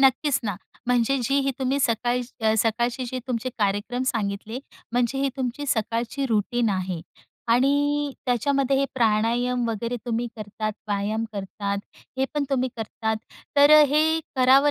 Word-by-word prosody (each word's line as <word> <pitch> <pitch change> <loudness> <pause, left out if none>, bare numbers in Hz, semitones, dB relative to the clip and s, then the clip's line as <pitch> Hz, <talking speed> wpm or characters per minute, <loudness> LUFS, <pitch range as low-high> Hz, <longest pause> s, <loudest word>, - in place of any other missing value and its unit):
नक्कीच 270 +1 +4
ना. 205 -4 -2 0.3
म्हणजे 245 +2 +3
जी 270 - +1
ही 275 0 +1
तुम्ही 265 +1 +1
सकाळ 240 0 +1 0.4
सकाळचे 235 +3 +1
जे 255 +2 -4
तुमचे 250 0 -2
कार्यक्रम 205 +5 0
सांगितले. 215 0 -2 0.3
म्हणजे 245 +2 +1
ही 275 0 +2
तुमची 260 +2 -3
सकाळची 230 +4 -1
रुटीन 230 +1 +1
आहे 185 -3 -2 0.5
आणि 285 +3 +2
त्याच्यामध्ये 270 +2 +2
हे 275 - +3
प्राणायाम 235 +1 +2
वगैरे 230 +2 -2
तुम्ही 235 0 0
करतात, 215 0 -4 0.2
व्यायाम 210 +2 0
करतात, 200 0 -3 0.4
हे 265 - +3
पण 295 -1 +1
तुम्ही 260 -1 +1
करतात, 220 0 -2 0.4
तर 285 +1 +7
अ, - - +9
हे 315 +3 +3 0.2
करावं 265 +3 +6
240 Hz, 145 wpm, -25 LUFS, 220-270 Hz, 0.5 s, अ